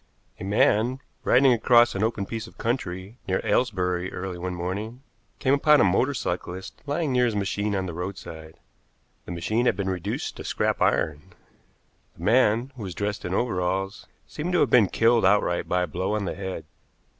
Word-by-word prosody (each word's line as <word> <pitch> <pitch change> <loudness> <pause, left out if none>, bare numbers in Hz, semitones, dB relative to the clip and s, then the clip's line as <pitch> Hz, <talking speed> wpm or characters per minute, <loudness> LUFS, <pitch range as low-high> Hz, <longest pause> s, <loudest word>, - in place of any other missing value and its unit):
A - - -6
man, 110 +5 +2 0.2
riding 130 0 +5
across 120 +1 +5
an 100 - -3
open 110 -3 -1
piece 115 +1 -5
of - - -17
country 105 -2 -3
near 95 - +1
Aylesbury 95 -5 0
early 90 -1 -5
one 90 0 -4
morning, 105 +8 -5 0.3
came 135 -1 +1
upon 150 +1 +5
a - - +6
motor 110 +9 +2
cyclist 90 -2 -5
lying 145 +1 -1
near 125 -1 +3
his 115 -3 -1
machine 100 +1 -1
on 95 -1 -1
the 90 - -5
roadside. 80 -3 -7 0.7
The - - -7
machine 110 +8 0
had - - +3
been 95 -1 -2
reduced 95 +3 -4
to - - -7
scrap - - -1
iron. 75 -1 0 0.8
The - - -10
man, 120 +2 +3
who 120 - -10
was 95 -4 -6
dressed 105 -1 -3
in 90 +1 -2
overalls, 95 -3 -1 0.2
seemed 170 +4 -4
to 175 - +3
have - - +2
been 115 -5 +6
killed 115 0 +3
outright 95 -2 +2
by 90 0 +2
a - - -2
blow 95 +7 -2
on 105 -2 -2
the - - -2
head. 95 -4 -6
100 Hz, 185 wpm, -25 LUFS, 90-120 Hz, 0.8 s, a